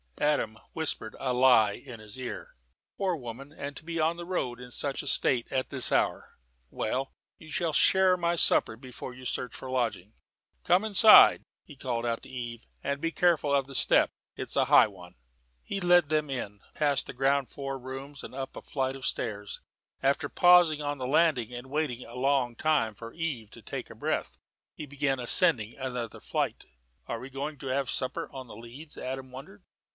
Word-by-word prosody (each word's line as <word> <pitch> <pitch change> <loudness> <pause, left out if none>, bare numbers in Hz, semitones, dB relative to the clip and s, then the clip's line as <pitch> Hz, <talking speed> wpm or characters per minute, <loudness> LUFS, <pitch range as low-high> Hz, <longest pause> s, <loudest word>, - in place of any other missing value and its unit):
Adam 145 -7 +1 0.2
whispered 155 -8 -1
a 130 -2 -1
lie 125 -5 +5
in 120 0 -10
his 110 +3 -6
ear. 125 -1 -7 0.4
"Poor 190 -3 0
woman, 135 0 -9
and 145 -2 -7
to - - -9
be 165 0 -4
on 160 +2 +1
the 175 - -7
road, 130 -10 -3
in 125 0 -10
such 140 +3 -2
a 145 - -7
state, 125 -3 +4
at 130 -1 -1
this 130 -3 +2
hour! - - 0 0.3
Well, 130 - -3 0.3
you 160 - -14
shall 165 0 -1
share 190 +3 +4
my 170 -1 0
supper 110 - +3
before 125 +1 -9
you 130 0 -12
search 125 -1 -3
for - - -9
a - - -6
lodging. 110 -5 -2 0.5
Come 180 +4 +3
inside," 220 0 +7 0.2
he 150 - -14
called 120 -3 -3
out 115 -1 -1
to - - -12
Eve, 120 -2 -7 0.2
"and 140 +1 -2
be 165 - -1
careful 165 -5 +2
of 140 -1 +2
the 135 - -11
step. - - +4 0.3
It's - - -6
a - - +3
high - - +6
one." 90 -4 -14 0.5
He 195 - -4
led 175 -4 +4
them 155 -1 0
in, 105 -6 -5 0.2
past 145 -2 +1
the - - -7
ground 135 +1 +1
floor 135 -1 -5
rooms 135 +3 -8
and - - -9
up 135 0 -6
a - - -7
flight 135 -1 -2
of 135 - -6
stairs. 105 -3 -3 0.4
After 140 +1 +1
pausing 175 -4 +5
on 145 -1 -3
the 130 - -3
landing 135 -5 +2
and 120 +1 -8
waiting 140 -4 -2
a 115 - -12
long 130 -2 +1
time 150 -6 +1
for 115 +2 -10
Eve 145 -10 -4
to - - -12
take - - -6
breath, - - -3 0.4
he 150 - -7
began 145 -1 -1
to 125 - -5
ascend 120 0 +4
another 120 +1 -6
flight. - - -3 0.4
"Are 115 - -4
we 130 - -9
going 145 +3 -5
to 135 - -7
have 135 +1 -1
supper 130 - -2
on 130 -2 -8
the 115 - -11
leads?" 120 +7 -11
Adam 130 0 -6
wondered. 180 +10 -11
135 Hz, 195 wpm, -28 LUFS, 125-150 Hz, 0.5 s, inside